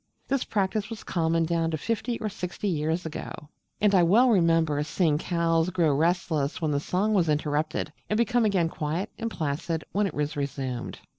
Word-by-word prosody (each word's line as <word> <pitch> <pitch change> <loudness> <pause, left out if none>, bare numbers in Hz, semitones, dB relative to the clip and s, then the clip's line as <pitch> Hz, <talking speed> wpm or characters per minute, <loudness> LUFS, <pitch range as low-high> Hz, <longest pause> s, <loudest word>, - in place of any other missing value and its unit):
This 275 -1 +1
practice 205 +1 -1
was 225 -2 -7
common 165 -1 +1
down 165 0 0
to 160 - -2
fifty 230 - -2
or 220 - -2
sixty 195 -1 -4
years 160 0 -1
ago; 160 - -5 0.5
and 205 -1 +3
I 185 - +6
well 215 +10 +5
remember 165 -6 +3
seeing 150 0 +1
cows 165 0 +1
grow 170 -5 +2
restless 160 -1 0
when 160 -3 0
the 140 - +1
song 195 +8 0
was 175 -6 +2
interrupted, 150 0 -1 0.2
and 210 - +1
become 240 +1 +2
again 195 -6 +2
quiet 165 +7 -3
and 230 - -2
placid 160 -2 -2
when 205 0 +1
it - - -7
was 150 +1 -1
resumed. 135 -3 -4
165 Hz, 180 wpm, -27 LUFS, 155-200 Hz, 0.5 s, I